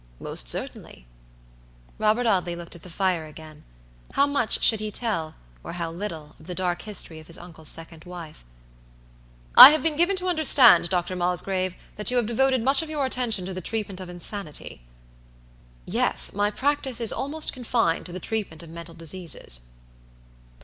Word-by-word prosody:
"Most -, -, -1 dB
certainly." -, -, -3 dB, 0.9 s
Robert 220 Hz, +3 st, +1 dB
Audley 180 Hz, -5 st, 0 dB
looked 170 Hz, 0 st, -9 dB
at 170 Hz, -, -13 dB
the 180 Hz, -, -12 dB
fire 175 Hz, -3 st, -2 dB
again. 155 Hz, 0 st, -13 dB, 0.5 s
How 280 Hz, -, +3 dB
much 280 Hz, -6 st, -1 dB
should 220 Hz, -, +5 dB
he 215 Hz, 0 st, -4 dB
tell, 200 Hz, -8 st, -3 dB, 0.3 s
or -, -, -8 dB
how 170 Hz, -2 st, -5 dB
little, 165 Hz, -4 st, -8 dB
of 160 Hz, -, -17 dB
the 180 Hz, -, -6 dB
dark 175 Hz, -1 st, -2 dB
history 185 Hz, -6 st, -2 dB
of 155 Hz, -, -15 dB
his 165 Hz, -, -1 dB
uncle's 165 Hz, -3 st, -8 dB
second 165 Hz, 0 st, -4 dB
wife? 175 Hz, -3 st, -11 dB, 1.1 s
"I -, -, +13 dB
have 310 Hz, +1 st, 0 dB
been 320 Hz, -2 st, 0 dB
given 350 Hz, +4 st, +2 dB
to 370 Hz, 0 st, -3 dB
understand, 285 Hz, -, +6 dB
Dr. 180 Hz, 0 st, -2 dB
Mosgrave, 180 Hz, +1 st, -2 dB, 0.2 s
that 210 Hz, -, +2 dB
you 250 Hz, -, +1 dB
have 240 Hz, -, +1 dB
devoted 260 Hz, +2 st, 0 dB
much 270 Hz, +4 st, +3 dB
of 320 Hz, -, -7 dB
your 295 Hz, -3 st, -2 dB
attention 240 Hz, -7 st, 0 dB
to 190 Hz, -, -6 dB
the 185 Hz, -, -6 dB
treatment 205 Hz, -1 st, -3 dB
of 185 Hz, -, -9 dB
insanity." 175 Hz, -, -6 dB, 1.0 s
"Yes, -, -, +4 dB
my 205 Hz, +1 st, 0 dB
practice 270 Hz, +1 st, -1 dB
is 230 Hz, -2 st, +5 dB
almost 300 Hz, +3 st, -2 dB
confined 230 Hz, -10 st, -1 dB
to -, -, -10 dB
the 185 Hz, -, -7 dB
treatment 195 Hz, -7 st, -4 dB
of 165 Hz, -, -13 dB
mental 170 Hz, 0 st, -11 dB
diseases." 160 Hz, -, -2 dB
185 Hz, 170 wpm, -24 LUFS, 165-240 Hz, 1.1 s, I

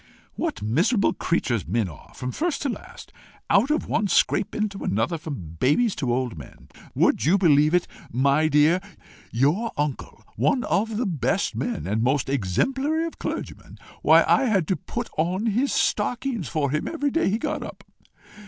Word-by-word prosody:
"What 100 Hz, -, -3 dB
miserable 180 Hz, -, +2 dB
creatures 125 Hz, -, -1 dB
men 110 Hz, +3 st, 0 dB
are 80 Hz, -5 st, -13 dB
from 125 Hz, 0 st, -4 dB
first 315 Hz, -, -2 dB
to 280 Hz, -, 0 dB
last! -, -, -9 dB, 0.4 s
Out 205 Hz, +7 st, +4 dB
of 305 Hz, -, 0 dB
one 205 Hz, -, +1 dB
scrape 200 Hz, +1 st, +1 dB
into 210 Hz, -2 st, -2 dB
another 115 Hz, -, 0 dB
from 95 Hz, -, -7 dB
babies 205 Hz, -, +3 dB
to 125 Hz, -4 st, -1 dB
old 120 Hz, -8 st, -2 dB
men! 65 Hz, -, -14 dB, 0.3 s
Would -, -, +2 dB
you 170 Hz, +7 st, +4 dB
believe 155 Hz, -3 st, +4 dB
it, 180 Hz, -, +1 dB, 0.2 s
my 140 Hz, +5 st, +2 dB
dear? 155 Hz, +4 st, +4 dB, 0.5 s
your 155 Hz, -, +1 dB
uncle, 145 Hz, -1 st, -3 dB
one 255 Hz, -3 st, +2 dB
of 215 Hz, +2 st, 0 dB
the 245 Hz, -, 0 dB
best 165 Hz, -, 0 dB
of -, -, -5 dB
men, 75 Hz, -, -3 dB
and 105 Hz, +4 st, -1 dB
most 130 Hz, +3 st, +1 dB
exemplary 265 Hz, -, 0 dB
of 330 Hz, -, -7 dB
clergymen -, -, -6 dB, 0.2 s
why, -, -, +6 dB
I 270 Hz, -, +4 dB
had 195 Hz, -9 st, +1 dB
to 190 Hz, -, +2 dB
put 235 Hz, +5 st, -5 dB
on 180 Hz, +6 st, 0 dB
his 235 Hz, +6 st, +1 dB
stockings 245 Hz, -, 0 dB
for 140 Hz, +3 st, -1 dB
him 155 Hz, +1 st, -1 dB
every 290 Hz, -4 st, -1 dB
day 330 Hz, -4 st, +1 dB
he 210 Hz, -, +1 dB
got 305 Hz, +4 st, -3 dB
up! -, -, -9 dB
170 Hz, 175 wpm, -24 LUFS, -, 0.5 s, why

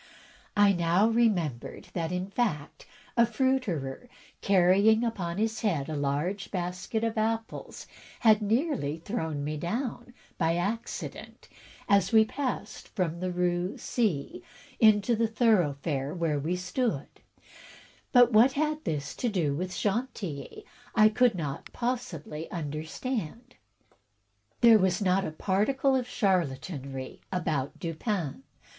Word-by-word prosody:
I 205 Hz, -1 st, +6 dB
now 175 Hz, +4 st, +3 dB
remembered 190 Hz, -, 0 dB
that, 165 Hz, -2 st, -2 dB
in 180 Hz, +2 st, -3 dB
fact, 190 Hz, -11 st, -2 dB, 0.3 s
a 235 Hz, -, +6 dB
fruiterer, 235 Hz, -, -1 dB, 0.3 s
carrying 200 Hz, +4 st, +4 dB
upon 190 Hz, -7 st, -2 dB
his 220 Hz, +1 st, -1 dB
head 165 Hz, -10 st, 0 dB
a 155 Hz, -, -3 dB
large 150 Hz, +8 st, -1 dB
basket 180 Hz, +5 st, -3 dB
of 225 Hz, -1 st, 0 dB
apples, 225 Hz, +1 st, -3 dB, 0.4 s
had 215 Hz, -2 st, +5 dB
nearly 220 Hz, -, 0 dB
thrown 160 Hz, -5 st, -3 dB
me 150 Hz, +1 st, -3 dB
down, 240 Hz, -, -4 dB, 0.2 s
by 165 Hz, -1 st, +2 dB
accident, 205 Hz, +7 st, -4 dB, 0.4 s
as 200 Hz, -2 st, +3 dB
we 220 Hz, -1 st, +6 dB
passed 250 Hz, -4 st, -4 dB
from 170 Hz, -4 st, -2 dB
the 185 Hz, 0 st, -2 dB
Rue 180 Hz, +1 st, -1 dB
C 195 Hz, -, -1 dB, 0.4 s
into 215 Hz, +1 st, +5 dB
the 225 Hz, +1 st, +1 dB
thoroughfare 160 Hz, -, +1 dB
where 165 Hz, -4 st, 0 dB
we 160 Hz, +6 st, -1 dB
stood; 180 Hz, -, -1 dB, 1.1 s
but 245 Hz, -2 st, +6 dB
what 235 Hz, +5 st, +6 dB
had 305 Hz, +2 st, -1 dB
this 140 Hz, -3 st, -3 dB
to 245 Hz, -, 0 dB
do 170 Hz, -9 st, 0 dB
with 180 Hz, +4 st, -3 dB
Chantilly 215 Hz, -, -3 dB, 0.3 s
I 215 Hz, -1 st, +7 dB
could 235 Hz, 0 st, +3 dB
not 150 Hz, -6 st, -5 dB
possibly 180 Hz, -, -4 dB
understand. 165 Hz, -, -4 dB, 1.1 s
There 230 Hz, -2 st, +8 dB
was 185 Hz, 0 st, +2 dB
not 195 Hz, -1 st, +2 dB
a -, -, -3 dB
particle 215 Hz, -, +1 dB
of 250 Hz, -2 st, 0 dB
charlatanerie 140 Hz, -, -2 dB
about 155 Hz, -7 st, -2 dB
Dupin. 170 Hz, -, -3 dB
190 Hz, 125 wpm, -28 LUFS, 160-225 Hz, 1.1 s, There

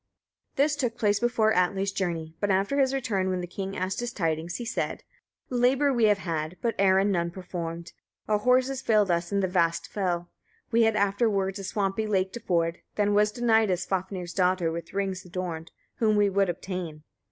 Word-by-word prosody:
This 290 Hz, +2 st, +2 dB
took 245 Hz, -5 st, -2 dB
place 205 Hz, -3 st, +2 dB
before 225 Hz, -2 st, +2 dB
Atli's 190 Hz, +2 st, +1 dB
journey; 165 Hz, -5 st, -3 dB
but 205 Hz, -, 0 dB
after 195 Hz, +9 st, +1 dB
his 265 Hz, -1 st, +3 dB
return, 225 Hz, -9 st, -1 dB
when 185 Hz, -1 st, -1 dB
the 180 Hz, -, -3 dB
king 195 Hz, +2 st, -5 dB
asked 185 Hz, +1 st, -2 dB
his 240 Hz, 0 st, -3 dB
tidings, 165 Hz, -3 st, -2 dB
he 240 Hz, -, -4 dB
said: 230 Hz, -, -3 dB, 0.5 s
5. 245 Hz, -, 0 dB
Labour 270 Hz, +3 st, +3 dB
we 235 Hz, -3 st, +3 dB
have 210 Hz, -1 st, +4 dB
had, 165 Hz, -2 st, -3 dB
but 230 Hz, -1 st, 0 dB
errand 195 Hz, +1 st, +4 dB
none 170 Hz, -2 st, 0 dB
performed; 170 Hz, -2 st, -6 dB, 0.3 s
our 210 Hz, -1 st, +2 dB
horses 255 Hz, +3 st, +2 dB
failed 210 Hz, -6 st, +3 dB
us 170 Hz, +1 st, -1 dB
in 200 Hz, 0 st, +1 dB
the 190 Hz, -, +1 dB
vast 170 Hz, -2 st, +1 dB
fell; 175 Hz, -3 st, -2 dB, 0.4 s
we 230 Hz, 0 st, +4 dB
had 220 Hz, -1 st, +2 dB
afterwards 200 Hz, -1 st, +1 dB
a -, -, -6 dB
swampy 200 Hz, +2 st, -1 dB
lake 190 Hz, -2 st, 0 dB
to 235 Hz, -, -5 dB
ford; 170 Hz, -5 st, 0 dB, 0.2 s
then 205 Hz, 0 st, +2 dB
was 210 Hz, +1 st, +4 dB
denied 225 Hz, -2 st, +3 dB
us 180 Hz, -1 st, 0 dB
Svafnir's 185 Hz, -2 st, -3 dB
daughter 180 Hz, -3 st, +2 dB
with 165 Hz, 0 st, -6 dB
rings 195 Hz, -2 st, -2 dB
adorned, 175 Hz, -3 st, -5 dB, 0.3 s
whom 215 Hz, -2 st, +2 dB
we 205 Hz, -1 st, +3 dB
would 195 Hz, -1 st, +2 dB
obtain. 175 Hz, -3 st, -5 dB
195 Hz, 195 wpm, -27 LUFS, 180-220 Hz, 0.5 s, have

